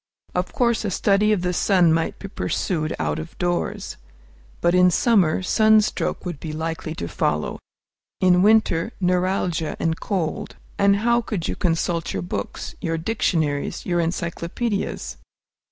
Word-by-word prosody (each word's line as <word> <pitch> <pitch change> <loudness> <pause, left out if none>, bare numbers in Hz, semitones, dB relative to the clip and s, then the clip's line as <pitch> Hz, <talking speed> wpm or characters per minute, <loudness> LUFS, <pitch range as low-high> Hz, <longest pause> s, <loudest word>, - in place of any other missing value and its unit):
Of - - -1
course, 235 -3 +1
a 210 - -1
study 200 +2 +2
of 200 -4 +1
the 180 0 0
sun 180 -3 +4
might 165 0 -1
be 200 - -7
pursued 170 -5 -2
out - - -1
of 160 +1 -9
doors. 175 -1 -2 0.6
But 170 - +2
in 180 0 +6
summer, 185 -3 +3
sunstroke 215 +1 +2
would 175 -5 -4
be 160 - -5
likely 160 0 -4
to 85 - -4
follow; 75 -2 -1 0.6
in 180 -1 +4
winter, 215 -2 +3
neuralgia 180 -3 0
and 165 0 0
cold. 175 -6 -3 0.2
And 200 0 +5
how 235 0 +4
could 200 -7 -3
you - - -2
consult 165 -1 -1
your 95 - -2
books, 90 - -5
your 165 0 -1
dictionaries, 160 -6 -1
your 175 -1 0
encyclopædias? 170 +5 -2
180 Hz, 145 wpm, -23 LUFS, 165-200 Hz, 0.6 s, in